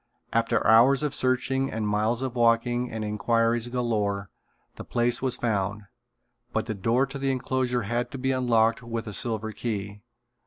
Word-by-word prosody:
After 115 Hz, 0 st, +1 dB
hours 125 Hz, +6 st, +6 dB
of 150 Hz, -, -1 dB
searching 130 Hz, +1 st, 0 dB
and 110 Hz, -1 st, -2 dB
miles 110 Hz, +4 st, 0 dB
of 130 Hz, -2 st, -3 dB
walking 120 Hz, +1 st, +2 dB
and 110 Hz, -1 st, -4 dB
inquiries 115 Hz, +2 st, +1 dB
galore, 105 Hz, -5 st, -1 dB, 0.4 s
the -, -, -8 dB
place 120 Hz, +1 st, 0 dB
was 130 Hz, -2 st, 0 dB
found, 105 Hz, -3 st, -1 dB, 0.7 s
but -, -, -1 dB
the 110 Hz, -, -3 dB
door 115 Hz, +6 st, +1 dB
to 140 Hz, +1 st, -7 dB
the 135 Hz, 0 st, 0 dB
enclosure 125 Hz, -1 st, -1 dB
had 120 Hz, +3 st, -2 dB
to 135 Hz, -, -7 dB
be 130 Hz, +1 st, 0 dB
unlocked 115 Hz, -3 st, +2 dB
with 115 Hz, -1 st, -4 dB
a 105 Hz, -, -6 dB
silver 110 Hz, +1 st, -2 dB
key. 105 Hz, -3 st, -4 dB
115 Hz, 165 wpm, -26 LUFS, 110-125 Hz, 0.7 s, hours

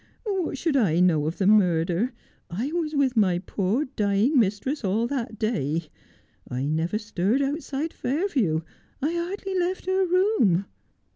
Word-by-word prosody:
What 380 Hz, -8 st, -1 dB
should 320 Hz, 0 st, 0 dB
I 185 Hz, -, +3 dB
know 160 Hz, -5 st, +3 dB
of 160 Hz, -, -3 dB
the 195 Hz, -, 0 dB
murder 180 Hz, +1 st, +3 dB, 0.4 s
1 175 Hz, -, -6 dB
I 265 Hz, +6 st, -1 dB
was 320 Hz, -2 st, -2 dB
with 270 Hz, -3 st, +2 dB
my 190 Hz, -5 st, +3 dB
poor 200 Hz, +8 st, -1 dB
dying 220 Hz, +2 st, +2 dB
mistress 230 Hz, +7 st, 0 dB
all 210 Hz, +4 st, +1 dB
that 235 Hz, -4 st, -3 dB
day. 165 Hz, -, -1 dB, 0.6 s
I 125 Hz, +2 st, -2 dB
never 160 Hz, +6 st, 0 dB
stirred 210 Hz, +4 st, 0 dB
outside 290 Hz, +2 st, -3 dB
Fair 300 Hz, +10 st, -1 dB
view 175 Hz, -, 0 dB, 0.2 s
— -, -, -36 dB
I 310 Hz, +3 st, +1 dB
hardly 380 Hz, +3 st, -3 dB
left 360 Hz, +1 st, -1 dB
her 375 Hz, +1 st, +2 dB
room.' 350 Hz, -, +3 dB
230 Hz, 160 wpm, -25 LUFS, 185-305 Hz, 0.6 s, I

